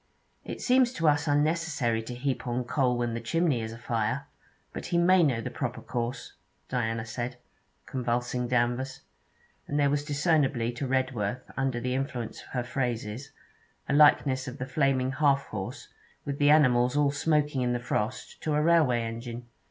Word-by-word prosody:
'It - - -6
seems 250 -1 +3
to 165 -7 0
us 150 +1 +3
unnecessary 145 -5 +1
to 120 +2 -7
heap 130 0 -2
on 120 +1 -1
coal 125 -1 +1
when 120 -1 -1
the 115 - -3
chimney 140 +1 +1
is 110 0 -4
afire; 115 +3 -2 0.5
but - - -6
he 170 - 0
may 180 +2 +5
know 135 -8 +2
the - - -5
proper 125 -3 -3
course,' 120 0 -4 0.4
Diana 115 -2 -1
said, 120 +2 -4 0.5
convulsing 125 0 -1
Danvers; 125 +2 0 0.7
and 145 - -1
there 140 -1 +3
was 145 0 0
discernibly 145 -5 +1
to 125 +3 -4
Redworth, 125 -3 -1
under 135 -3 -1
the 125 +1 -2
influence 130 -3 -3
of - - -15
her 125 -2 0
phrases, 120 0 -3 0.6
a - - 0
likeness 140 -3 +4
of 125 +2 -6
the 125 - -4
flaming 135 -1 +1
'half 140 0 +2
horse,' 95 -3 -6 0.4
with 140 0 -4
the 145 0 +4
animals 125 -3 +4
all 145 -1 +3
smoking 150 -1 +1
in 125 -1 +1
the 120 - -1
frost, 120 -1 -3
to 155 -2 0
a 150 - +2
railway 155 -8 +4
engine. 115 +1 -6
130 Hz, 170 wpm, -28 LUFS, 120-145 Hz, 0.7 s, may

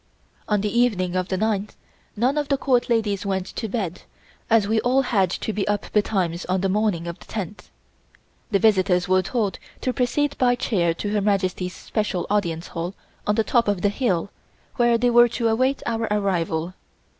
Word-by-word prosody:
On 210 -2 +2
the 210 +3 0
evening 185 -7 +1
of 185 0 0
the 190 - -1
ninth, 210 0 -1 0.4
none 250 +6 +1
of 295 -1 -1
the 275 - +1
Court 255 -3 +1
ladies 215 -4 +1
went 190 -2 -1
to 225 - -5
bed, 190 -5 -3 0.5
as 225 -3 +4
we 220 +1 +2
all 255 +3 +2
had 195 -7 +2
to 220 - -3
be 205 -1 -2
up 205 -1 -1
betimes 190 -5 0
on 185 0 0
the 195 - +1
morning 200 -4 0
of 170 0 -6
the - - -14
tenth. 205 -2 -6 0.8
The 200 - +3
visitors 190 -4 +3
were 185 0 +4
told 205 0 -2 0.2
to 255 - -1
proceed 285 +4 0
by 245 -1 +4
chair 175 -9 0
to 205 +4 -3
Her 210 -1 +1
Majesty's 185 -2 0
special 210 -5 -2
Audience 170 -5 -1
Hall 175 +3 -4 0.3
on 210 - +2
the 225 - +2
top 235 +1 +2
of 200 -3 0
the 205 - +4
hill, 200 -5 -1 0.5
where 240 -1 +4
they 245 +1 +2
were 240 0 +7
to 235 0 -1
await 260 +5 +1
our 225 -1 -1
arrival. 180 -4 0
205 Hz, 190 wpm, -23 LUFS, 185-235 Hz, 0.8 s, were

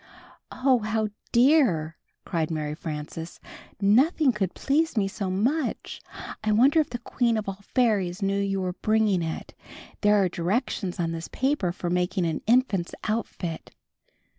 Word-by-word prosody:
''Oh, 255 -3 +2
how 215 0 0 0.2
dear!" 235 - +3 0.3
cried 165 -4 -1
Mary 155 -2 -2
Frances. 160 +1 -6 0.4
"Nothing 260 - +4
could 200 -5 -2
please 305 0 0
me 200 -2 +2
so 195 -1 -4
much. 245 +10 -1 0.4
I 215 - +1
wonder 265 +9 +5
if 310 - +1
the 240 - -4
Queen 235 -1 0
of 215 - -3
All 195 0 -4 0.2
Fairies 205 -8 +2
knew 195 0 +1
you 195 -1 -1
were 180 -1 -2
bringing 215 -2 +1
it? 160 -1 -5 0.5
There 210 0 +4
are 195 -2 +4
directions 180 +2 -2
on 165 -1 0
this 165 0 -5
paper 265 -9 0
for 175 -1 -4
making 180 +1 0
an 160 -2 -2
infant's 225 -7 +2
outfit." 205 -6 -4
200 Hz, 150 wpm, -26 LUFS, 175-240 Hz, 0.5 s, wonder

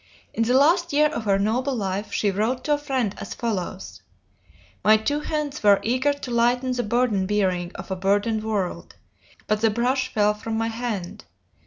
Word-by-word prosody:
In - - -2
the 240 +3 +2
last 340 +4 +3
year 300 +1 +4
of 235 -7 -5
her 195 -1 +3
noble 245 +7 0
life 200 -1 -3
she 205 - +1
wrote 220 +6 -1
to 300 - +1
a - - +2
friend 260 -8 -1
as - - -6
follows: 175 - -4 0.8
"My 215 +3 +6
two 290 +7 -1
hands 300 -2 -3
were 205 -1 +5
eager 255 +5 +1
to 285 -3 -6
lighten 245 +2 +2
the 250 -1 0
burden 225 -4 +1
bearing 185 -4 0
of - - -8
a - - 0
burdened 205 +4 0
world 205 -5 -3 0.5
but 215 0 0
the 225 - +4
brush 255 +4 0
fell 210 -1 +2
from 220 +1 -4
my 225 0 0
hand. 225 -6 -5
225 Hz, 185 wpm, -24 LUFS, 205-255 Hz, 0.8 s, My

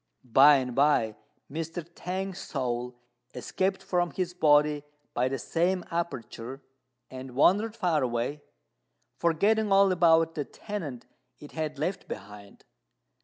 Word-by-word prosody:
By 135 +5 +7
and 130 -2 -1
by 130 -5 +2 0.3
Mr. 165 +2 -5
T'ang's 185 +2 -5
soul 125 -2 -3 0.4
escaped 190 0 -2
from 175 -2 0
his 180 -1 -3
body 150 -3 +3 0.3
by 125 +1 +1
the 135 +1 -2
same 170 - 0
aperture, 135 -6 -5 0.5
and 130 -1 -8
wandered 205 - +3
far 175 -8 +1
away, 125 +4 -2 0.8
forgetting 205 +6 +2
all 195 0 +5
about 165 -2 +4
the 150 - -2
tenement 155 - -7 0.3
it 145 - -12
had 155 -2 -4
left 175 +7 -3
behind. 100 +1 -10
155 Hz, 120 wpm, -28 LUFS, 130-180 Hz, 0.8 s, By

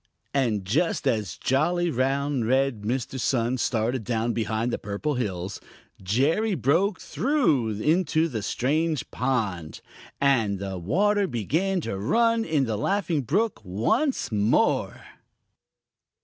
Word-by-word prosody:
And 115 -8 0
just 165 - 0
as 105 -7 -1
jolly, 170 +6 +1
round, 135 -1 0
red 130 -3 +1
Mr. 125 +4 -3
Sun 120 +1 0
started 115 +1 0
down 115 +1 -1
behind 110 +2 -1
the - - -2
Purple 105 +9 -3
Hills, 95 -6 -3 0.4
Jerry 145 - +1
broke 170 - +1
through 145 - 0
into 160 +3 +2
the 115 -9 -4
strange 150 +7 -1
pond, 105 -11 -2 0.4
and 115 -8 +2
the 95 -1 -5
water 200 - +2
began 165 - -1
to 95 -10 -4
run 230 - +2
in 155 -8 +1
the 110 -3 -2
Laughing 180 - 0
Brook 200 - 0
once 115 - 0
more. 105 +1 +1
130 Hz, 120 wpm, -25 LUFS, 110-165 Hz, 0.4 s, into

